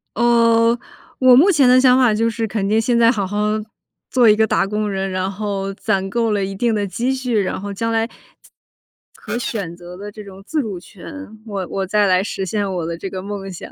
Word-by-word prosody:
呃， 230 Hz, 0 st, +3 dB, 0.4 s
我 255 Hz, -1 st, +7 dB
目 335 Hz, +11 st, +6 dB
前 285 Hz, -7 st, +4 dB
的 250 Hz, +1 st, +6 dB
想 255 Hz, -1 st, +5 dB
法 250 Hz, -4 st, +4 dB
就 225 Hz, +2 st, +1 dB
是 225 Hz, 0 st, -3 dB
肯 200 Hz, -2 st, -2 dB
定 215 Hz, +1 st, +3 dB
现 235 Hz, +1 st, +1 dB
在 230 Hz, 0 st, +5 dB
好 205 Hz, -5 st, -1 dB
好 205 Hz, +2 st, -4 dB, 0.7 s
做 245 Hz, -3 st, +5 dB
一 210 Hz, -, +6 dB
个 220 Hz, +1 st, +3 dB
打 210 Hz, -, +1 dB
工 210 Hz, +1 st, -2 dB
人， 195 Hz, -1 st, -2 dB
然 185 Hz, 0 st, -2 dB
后， 195 Hz, -1 st, -3 dB
攒 195 Hz, 0 st, -1 dB
够 230 Hz, -1 st, 0 dB
了 200 Hz, -2 st, 0 dB
一 195 Hz, -, -5 dB
定 235 Hz, +3 st, 0 dB
的 205 Hz, -1 st, 0 dB
积 240 Hz, +7 st, -1 dB
蓄， 250 Hz, -4 st, -1 dB
然 190 Hz, -, -3 dB
后 200 Hz, +1 st, -6 dB
将 230 Hz, +3 st, -2 dB
来 225 Hz, 0 st, +1 dB, 1.1 s
可 -, -, -5 dB
选 200 Hz, -8 st, -4 dB
择 175 Hz, +1 st, -11 dB
的 205 Hz, +2 st, -8 dB
这 210 Hz, 0 st, -10 dB
种 195 Hz, -1 st, -12 dB
自 310 Hz, +6 st, -1 dB
主 205 Hz, -8 st, -5 dB
权， 220 Hz, +6 st, -11 dB
我 195 Hz, -4 st, -4 dB
我 195 Hz, -1 st, -2 dB
再 210 Hz, +1 st, +2 dB
来 185 Hz, -1 st, +3 dB
实 195 Hz, -1 st, -4 dB
现 200 Hz, +1 st, -2 dB
我 170 Hz, -2 st, -2 dB
的 165 Hz, 0 st, -4 dB
这 190 Hz, +3 st, -6 dB
个 185 Hz, -1 st, -6 dB
梦 195 Hz, -1 st, -6 dB
想。 180 Hz, -, -9 dB
210 Hz, 245 characters per minute, -19 LUFS, 195-230 Hz, 1.1 s, 我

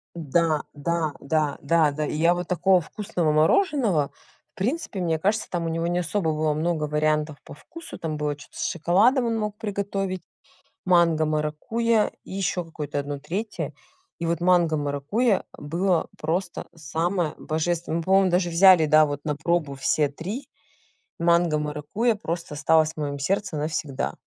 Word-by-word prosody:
Да, 160 Hz, 0 st, +1 dB
да, 155 Hz, +1 st, -1 dB
да, 150 Hz, 0 st, 0 dB
да, 155 Hz, 0 st, +3 dB
да. 150 Hz, +1 st, -2 dB
И 150 Hz, -, -3 dB
я 165 Hz, +3 st, +4 dB
вот 175 Hz, 0 st, -4 dB
такого 180 Hz, +1 st, +3 dB
вкусного 175 Hz, -4 st, -2 dB
мороженого, 185 Hz, -, +2 dB, 0.4 s
в -, -, -54 dB
принципе, 215 Hz, -, -2 dB
мне 165 Hz, -2 st, 0 dB
кажется 210 Hz, +5 st, 0 dB
там 170 Hz, -2 st, -2 dB
у -, -, -1 dB
него 165 Hz, +1 st, -1 dB
не 175 Hz, +1 st, 0 dB
особо 170 Hz, -1 st, 0 dB
было 155 Hz, 0 st, +1 dB
много 155 Hz, 0 st, -1 dB
вариантов 150 Hz, 0 st, 0 dB
по -, -, -11 dB
вкусу. 330 Hz, -, -11 dB
Там 155 Hz, -2 st, -4 dB
было 150 Hz, -1 st, -1 dB
чё-то 145 Hz, -, -15 dB
с -, -, -2 dB
шоколадом 205 Hz, -, +3 dB
он 230 Hz, -1 st, 0 dB
мог 210 Hz, -1 st, -2 dB
приготовить, 195 Hz, -3 st, -3 dB, 0.6 s
манго-маракуйя, 170 Hz, +6 st, +2 dB
и -, -, -12 dB
еще 190 Hz, -2 st, -1 dB
какое-то 150 Hz, -3 st, -4 dB
1 145 Hz, 0 st, -4 dB
3. 205 Hz, +9 st, -4 dB, 0.5 s
И 170 Hz, -, -2 dB
вот 165 Hz, 0 st, 0 dB
манго-маракуйя 170 Hz, -, +2 dB
было 170 Hz, +3 st, 0 dB
просто 170 Hz, +3 st, -3 dB
самое 165 Hz, +3 st, -1 dB
божественное. 165 Hz, +1 st, -2 dB
Мы 170 Hz, -, -2 dB
по-моему 190 Hz, 0 st, +4 dB
даже 175 Hz, 0 st, +2 dB
взяли 175 Hz, -1 st, +6 dB
да 155 Hz, 0 st, +6 dB
вот 145 Hz, -1 st, -4 dB
на 150 Hz, -2 st, -1 dB
пробу 160 Hz, -3 st, -1 dB
все 145 Hz, +2 st, +1 dB
3- 190 Hz, -, -6 dB, 0.7 s
манго-маракуйя 170 Hz, +5 st, +1 dB
просто 170 Hz, -5 st, -5 dB
осталось 155 Hz, +1 st, +3 dB
в -, -, -42 dB
моем 145 Hz, -2 st, -3 dB
сердце 190 Hz, +4 st, -1 dB
навсегда. 150 Hz, -2 st, -2 dB
165 Hz, 155 wpm, -25 LUFS, 150-190 Hz, 0.7 s, взяли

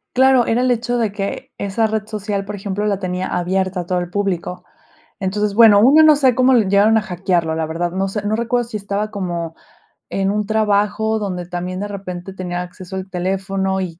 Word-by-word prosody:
Claro, 260 Hz, -1 st, +5 dB
era 230 Hz, +2 st, +1 dB
el 255 Hz, 0 st, +2 dB
hecho 240 Hz, +1 st, 0 dB
de 225 Hz, -4 st, 0 dB
que 200 Hz, -1 st, -5 dB
esa 200 Hz, +3 st, 0 dB
red 215 Hz, -1 st, -2 dB
social, 205 Hz, -2 st, -3 dB
por 210 Hz, +1 st, -5 dB
ejemplo, 200 Hz, +1 st, -3 dB
la 200 Hz, -2 st, 0 dB
tenía 185 Hz, -1 st, -3 dB
abierta 185 Hz, +1 st, -1 dB
a -, -, -8 dB
todo 180 Hz, +1 st, 0 dB
el 175 Hz, 0 st, -4 dB
público. 180 Hz, -2 st, -2 dB, 0.6 s
Entonces, 200 Hz, +2 st, -1 dB
bueno, 215 Hz, -2 st, +7 dB
1 280 Hz, +8 st, +7 dB
no 310 Hz, -1 st, +7 dB
sé 265 Hz, -4 st, +3 dB
cómo 255 Hz, +1 st, +4 dB
le 220 Hz, -6 st, +3 dB
llegaron 205 Hz, +3 st, +4 dB
a 215 Hz, -, -1 dB
hackearlo, 175 Hz, -4 st, -1 dB
la 160 Hz, 0 st, -1 dB
verdad, 170 Hz, +2 st, -2 dB
no 190 Hz, +1 st, -1 dB
sé, 205 Hz, +2 st, -4 dB
no 215 Hz, +1 st, +1 dB
recuerdo 240 Hz, +1 st, 0 dB
si 220 Hz, -, -5 dB
estaba 205 Hz, +1 st, -3 dB
como 175 Hz, -5 st, -4 dB, 0.6 s
en 195 Hz, 0 st, 0 dB
un 210 Hz, 0 st, -1 dB
trabajo 215 Hz, +1 st, +1 dB
donde 185 Hz, -4 st, -4 dB
también 180 Hz, +1 st, -4 dB
de 205 Hz, -, -3 dB
repente 190 Hz, -2 st, -7 dB
tenía 180 Hz, -1 st, -4 dB
acceso 180 Hz, +1 st, -10 dB
al 190 Hz, 0 st, -6 dB
teléfono, 190 Hz, +1 st, -1 dB
y 175 Hz, -3 st, -5 dB
200 Hz, 210 wpm, -19 LUFS, 185-215 Hz, 0.6 s, bueno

